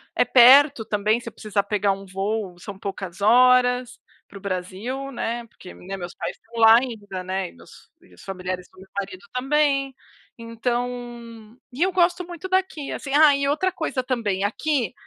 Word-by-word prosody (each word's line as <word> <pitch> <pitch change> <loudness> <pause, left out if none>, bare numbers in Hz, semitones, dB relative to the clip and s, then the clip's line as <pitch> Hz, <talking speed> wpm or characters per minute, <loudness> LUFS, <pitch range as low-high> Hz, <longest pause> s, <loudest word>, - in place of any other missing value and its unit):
É - - +3
perto 265 0 +7
também, 210 +2 +1
se 230 - -8
eu - - -22
precisar 210 -2 -2
pegar 200 -1 +1
um 195 0 -9
voo, 195 -1 -3
são 195 +1 -9
poucas 195 -1 -7
horas 250 +2 +4 0.3
para 200 - -12
o - - -12
Brasil, 200 +9 -4
né, 235 -1 -3
porque, 185 - -13
né, 195 +2 -8
meus 175 -1 -7
pais - - -5
estão 230 +1 -10
lá 225 +1 +9
ainda, 205 -7 -4
né, 190 0 -3
e - - -17
meus 85 0 -17
e 90 - -22
os 90 - -16
familiares 185 -1 -5
do 185 - -25
meu 190 - -14
marido 190 -1 -7
também. 275 0 +1 0.5
Então 235 -1 -5 0.2
E 280 - -7
eu 380 - +1
gosto 360 0 +2
muito 350 +1 -8
daqui, 375 -6 -1
assim. 275 - -7
E, - - -2
ah, 300 -2 +7
e 280 0 -1
outra 310 +6 +1
coisa 315 -7 -2
também, 220 -7 -1
aqui 245 - -1
230 Hz, 185 wpm, -23 LUFS, 195-270 Hz, 0.5 s, lá